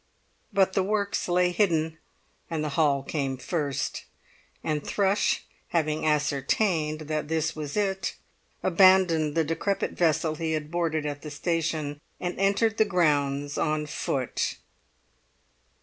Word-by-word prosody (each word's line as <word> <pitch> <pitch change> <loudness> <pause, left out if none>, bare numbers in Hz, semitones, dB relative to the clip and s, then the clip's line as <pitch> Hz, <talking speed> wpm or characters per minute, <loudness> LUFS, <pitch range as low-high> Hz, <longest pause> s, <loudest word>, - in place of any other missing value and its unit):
But 190 -1 +3
the 195 - +2
works 200 +1 -1
lay 180 0 +3
hidden, 160 -5 +1 0.5
and 160 -2 -2
the 150 - -1
hall 140 -2 +2
came 135 -2 -2
first; 145 0 -2 0.6
and 150 -2 -1
Thrush, 200 0 +1 0.2
having 155 -2 0
ascertained 150 +2 +1
that 155 -1 -3
this 160 0 0
was 150 +2 -5
it, 195 -3 0 0.5
abandoned 180 -4 +5
the 165 - +3
decrepit 165 +6 -1
vessel 160 -2 +1
he 160 +1 -2
had 155 -1 -3
boarded 165 -3 0
at 145 -1 -4
the 155 - -7
station, 155 -3 -2 0.2
and 180 0 -2
entered 200 +3 +2
the 220 - +6
grounds 145 -6 +1
on 155 0 0
foot. 135 -3 -2
160 Hz, 130 wpm, -27 LUFS, 150-180 Hz, 0.6 s, the